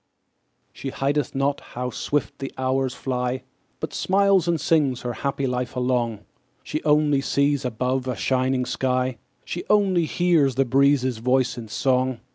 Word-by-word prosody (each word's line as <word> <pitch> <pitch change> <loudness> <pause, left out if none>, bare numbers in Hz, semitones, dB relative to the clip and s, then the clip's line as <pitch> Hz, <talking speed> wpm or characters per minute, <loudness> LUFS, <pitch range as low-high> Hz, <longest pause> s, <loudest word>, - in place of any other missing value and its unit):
She 135 - -5
heedeth 140 +1 -1
not 140 +1 +1
how 125 +1 -5
swift 145 +4 -2
the 135 - -5
hours 130 0 0
fly, 125 0 -2 0.4
But - - -5
smiles 195 -2 +3
and 170 -2 +1
sings 145 -7 +2
her 120 -1 -3
happy 140 +2 -2
life 125 -1 -2
along; 125 -4 0 0.4
She 155 - -4
only 150 -2 +3
sees 140 0 +1
above 125 +2 -1
a 125 - -1
shining 130 0 0
sky; 130 -2 -1 0.3
She 175 - -4
only 195 -5 +3
hears 160 -6 +2
the 135 +1 +2
breezes' 130 -1 +2
voice 125 +2 +1
in 120 -2 -7
song. 130 +2 0
130 Hz, 150 wpm, -24 LUFS, 125-145 Hz, 0.4 s, smiles